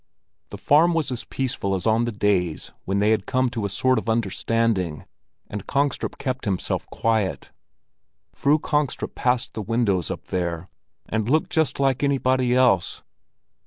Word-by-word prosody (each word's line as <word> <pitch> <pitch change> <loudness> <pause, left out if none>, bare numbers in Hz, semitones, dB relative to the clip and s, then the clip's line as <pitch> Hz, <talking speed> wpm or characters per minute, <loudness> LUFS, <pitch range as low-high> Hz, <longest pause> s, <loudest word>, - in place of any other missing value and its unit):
The - - -8
farm 165 +4 +4
was 155 -5 0
as 125 - -4
peaceful 120 -7 -2
as 90 - -4
on 115 +2 +3
the 120 - -2
days 100 -6 0
when 95 +1 -1
they 105 +2 +3
had 105 -3 0
come 130 -1 +1
to 115 -4 -3
a - - -1
sort 130 +4 +2
of 115 - -5
understanding, 110 -5 0 0.4
and 105 -2 -7
Kongstrup 140 -1 -1
kept 130 -2 -3
himself 95 -3 -2
quiet. 110 -4 -1 0.8
Fru 145 +2 +3
Kongstrup 150 -2 -1
passed 125 -1 0
the 110 - -4
windows 105 -5 0
up - - -5
there, 85 -1 -2 0.4
and 110 +1 -1
looked 155 +3 +2
just 160 -4 +1
like 135 -2 +2
anybody 130 -3 +2
else. 120 -9 +3
115 Hz, 160 wpm, -23 LUFS, 100-130 Hz, 0.8 s, farm